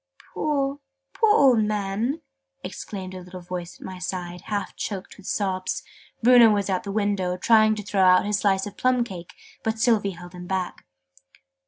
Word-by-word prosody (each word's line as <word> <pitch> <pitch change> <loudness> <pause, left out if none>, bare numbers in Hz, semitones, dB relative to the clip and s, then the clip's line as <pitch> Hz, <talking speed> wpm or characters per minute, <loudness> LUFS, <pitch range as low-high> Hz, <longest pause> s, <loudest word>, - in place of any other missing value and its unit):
"Poor, 280 -2 -1 0.3
poor 435 -2 +4
old 255 -6 +5
man!" 210 +7 -1 0.4
exclaimed 190 -7 -6
a 185 - -6
little 180 0 -9
voice 175 -1 -7
at - - -10
my 185 -1 -7
side, 180 -1 -5
half 205 -1 -3
choked 195 -3 -5
with 200 - -13
sobs. 185 -3 -1 0.4
Bruno 240 -1 +8
was 205 -2 +1
at 185 - 0
the 200 - -6
window, 200 -3 0
trying 215 +2 +4
to 210 - -6
throw 200 -1 0
out 185 0 +6
his 205 -1 0
slice 195 -1 +2
of 205 - -9
plum 255 -1 +2
cake, 180 -7 -9 0.3
but 220 0 -1
Sylvie 215 -5 +2
held 175 +1 -11
him 180 0 -9
back. 185 -1 -3
200 Hz, 175 wpm, -24 LUFS, 185-220 Hz, 0.4 s, Bruno